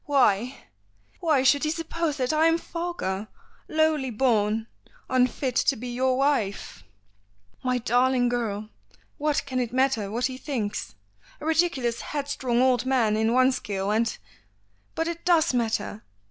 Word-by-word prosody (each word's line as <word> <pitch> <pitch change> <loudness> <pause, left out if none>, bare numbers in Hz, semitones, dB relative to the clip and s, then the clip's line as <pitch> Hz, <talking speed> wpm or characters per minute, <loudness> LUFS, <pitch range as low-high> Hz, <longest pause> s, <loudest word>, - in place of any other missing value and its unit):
"Why, 255 -3 +2 0.6
why 305 -6 +2
should 280 +2 +4
he 305 - +1
suppose 330 -1 -2
that 255 +1 0
I 315 +1 +4
am 330 0 +3
vulgar, 335 - -4 0.4
lowly 310 -4 +1
born, 220 -2 +1 0.5
unfit 255 0 +1
to 275 - +3
be 245 +1 -6
your 255 +1 +1
wife?" 270 -8 -1 0.8
"My 255 -1 +1
darling 245 +1 +2
girl, 215 -3 -2 0.5
what 295 0 0
can 255 -2 -2
it 240 -2 -2
matter 260 -5 +1
what 235 +4 -1
he 260 -1 -3
thinks? 220 - -4 0.4
A - - -8
ridiculous 315 -8 +1
headstrong 270 -4 -1
old 250 -2 +3
man 235 -5 +2
in 220 +1 +1
one 255 +2 +4
scale, 200 -5 -2
and 225 +1 0 0.4
" 100 0 -41
"But 325 - -1
it 340 0 -5
does 340 -5 +3
matter. 225 -3 -1
255 Hz, 145 wpm, -26 LUFS, 225-290 Hz, 0.8 s, should